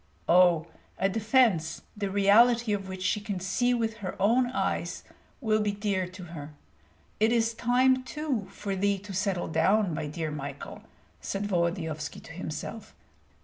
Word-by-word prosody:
Oh, 175 -2 +5 0.3
a 195 - +2
defence 215 -6 +2
the 205 -2 -2
reality 215 +4 +4
of 195 -1 -3
which 185 0 -5
she 210 - +1
can 205 -3 -4
see 225 +7 +1
with 225 -2 0
her 195 -4 -6
own 235 +6 +3
eyes 260 - -2 0.4
will 215 -3 +2
be 205 -1 0
dear 200 -3 -1
to 185 +1 -10
her. 150 -1 -8 0.6
It 220 +2 +4
is 230 -1 +2
time 255 +3 +3
too 260 -4 -3
for 200 -2 -4
thee 200 +1 +1
to 200 +1 -9
settle 190 -2 -1
down, 195 +2 +2
my 150 - -3
dear 155 +1 -4
Michael!" 145 -1 -7 0.4
said 200 +1 -3
Volodyovski 170 -5 -2
to - - -13
himself. 165 +6 -6
200 Hz, 155 wpm, -28 LUFS, 180-225 Hz, 0.6 s, Oh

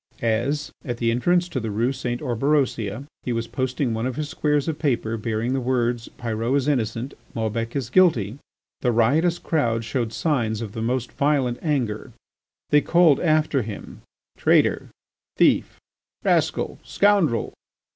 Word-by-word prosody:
As, 135 +7 0
at 120 -2 -4
the 115 -1 +1
entrance 175 +9 +2
to 130 - -2
the 115 -2 -4
Rue 115 +6 0
St. 125 -2 -3
Orberosia, 125 -3 0 0.2
he 125 - -3
was 115 -1 -1
posting 130 0 -2
one 110 +2 -1
of 130 - -4
his 150 0 -3
squares 150 -2 0
of 160 -2 -2
paper 120 -6 0
bearing 115 +2 -2
the 135 - 0
words: 120 -2 0
Pyrot 115 +2 -1
is 140 0 -1
innocent, 120 -2 -1 0.2
Maubec 115 +1 -2
is 125 -4 -3
guilty, 135 - +3 0.4
the 125 - +1
riotous 150 +10 +3
crowd 115 -8 0
showed 115 0 -2
signs 115 -8 0
of 110 -3 -5
the 110 - -5
most 125 +1 -1
violent 140 -4 +1
anger. 130 -9 -2 0.6
They 145 - +6
called 170 -3 +4
after 155 -4 +2
him, 105 -2 -8 0.4
"Traitor, - - +3 0.5
thief, - - +3 0.4
rascal, - - +1
scoundrel." 200 - +2
125 Hz, 150 wpm, -23 LUFS, 115-145 Hz, 0.6 s, They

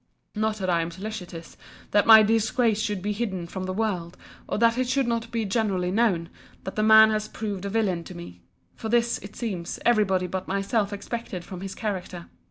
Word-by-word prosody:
—Not 215 0 0
that 190 -3 -3
I 170 -2 +2
am 165 - -3
solicitous, 180 -2 -8 0.4
that 205 - +3
my 220 -1 +10
disgrace 225 0 +2
should 210 -4 -2
be 210 - -1
hidden 200 -5 -3
from 185 +2 -6
the 185 - -3
world, 185 -4 -2 0.3
or - - -1
that 230 +1 +4
it 255 -1 0
should 270 0 +2
not 230 0 -2
be 230 -2 -2
generally 195 -4 0
known, 190 -6 +1 0.3
that 190 - -6
the 215 - 0
man 220 0 +7
has 215 0 -1
proved 205 -3 -5
a - - -2
villain 195 -5 0
to 185 - -10
me: 90 - -10 0.3
for 220 - -6
this, 235 0 +2
it 200 +1 -11
seems, 190 -8 -4
every 235 -3 +5
body 190 -2 0
but 185 +1 -4
myself 200 +2 0
expected 205 -3 -5
from 185 -2 -8
his 190 0 -6
character. 185 -5 -4
205 Hz, 205 wpm, -25 LUFS, 185-225 Hz, 0.4 s, my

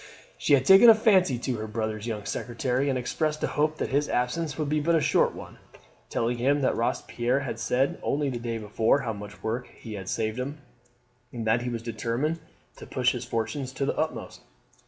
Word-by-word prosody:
She - - +1
had 130 -1 0
taken 195 - +9
a 225 - +9
fancy 190 - +4
to 125 0 -2
her 110 0 -4
brother's 110 0 -3
young 105 -3 -4
secretary, 125 +4 -1
and 130 - +1
expressed 150 +5 -2
a - - +2
hope 155 +1 +1
that - - -2
his 145 +2 +1
absence 145 +5 -1
would 155 -2 -1
be 150 +1 +1
but 165 +3 +2
a - - +4
short - - +2
one, - - -10 0.5
telling 120 +1 -1
him 140 +4 +2
that 130 - +2
Robespierre 120 +2 0
had 120 -4 -4
said 130 +4 0
only 145 0 0
the 120 - -4
day 115 -1 -3
before 110 +5 +1
how 115 -4 -2
much 105 0 -10
work 115 +3 -2
he 110 - -10
had 95 -2 -6
saved 110 +2 -1
him, 140 +4 -4 0.7
and 115 -2 -5
that 115 +2 +2
he 125 - -3
was 115 -1 -4
determined 120 +7 -2 0.4
to - - -10
push 130 -1 +2
his 125 - -5
fortunes 115 +4 -3
to 135 +1 -1
the - - -1
utmost. 155 0 -3
125 Hz, 210 wpm, -27 LUFS, 115-145 Hz, 0.7 s, taken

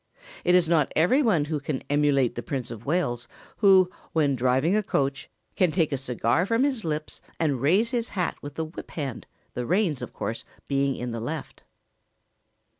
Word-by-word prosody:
It 180 - +4
is 180 -2 +4
not 160 -4 +2
every 180 - +4
one 190 - +2
who 150 0 -2
can 140 -1 -4
emulate 145 -4 +2
the 120 - -4
Prince 125 -2 -4
of 115 +2 -9
Wales, 140 -8 0 0.3
who, 190 -3 +6 0.3
when 145 -4 +2
driving 130 - +2
a 215 - +3
coach, 135 -8 -1 0.3
can 180 -3 +3
take 160 -3 +1
a - - +1
cigar 130 - 0
from 230 +4 +2
his 265 -6 0
lips 155 -1 -3 0.2
and 145 -6 0
raise 195 - +3
his 240 -2 -1
hat 180 -4 -1
with 145 0 -8
the 160 - -2
whip 155 - -9
hand, 135 -7 -5 0.3
the 125 -1 -4
reins, 180 -7 +1
of - - -6
course, - - -4 0.2
being 140 -1 +1
in 125 0 -4
the 115 - -4
left. 135 +6 -6
150 Hz, 190 wpm, -26 LUFS, 135-180 Hz, 0.3 s, who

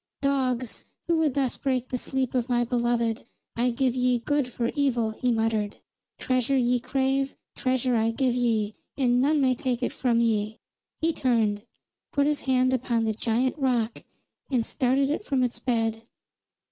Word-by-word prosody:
"Dogs, 255 -4 -1 0.2
who 335 -1 +2
would 310 -5 +1
thus 270 -3 0
break 255 -2 -1
the 250 - -1
sleep 265 -1 -2
of 250 -1 0
my 240 -1 +2
beloved, 235 -1 0 0.3
I 240 +2 +2
give 250 +1 +1
ye 250 -1 +2
good 285 +3 0
for 235 -1 -2
evil!" 245 -6 +1
he 245 +3 -1
muttered. 220 -2 0 0.4
"Treasure 255 +1 +1
ye 245 -1 +2
crave: 270 +2 0 0.2
treasure 255 -1 0
I 225 0 +2
give 250 +2 +1
ye, 225 -4 0 0.2
and 250 -2 +3
none 295 +3 +3
may 260 -2 +3
take 250 0 -2
it - - -1
from 240 -3 +1
ye!" 220 -2 0 0.4
He 325 +1 +2
turned, 225 -5 +1 0.4
put 285 0 +2
his 295 0 0
hand 255 0 +3
upon 235 -2 0
the 220 -1 0
great 235 +4 0
rock 240 -4 0 0.5
and 245 -5 +1
started 270 +2 +1
it 310 - -2
from 270 -8 0
its 235 -2 -2
bed. 225 -3 0
250 Hz, 170 wpm, -26 LUFS, 230-265 Hz, 0.5 s, and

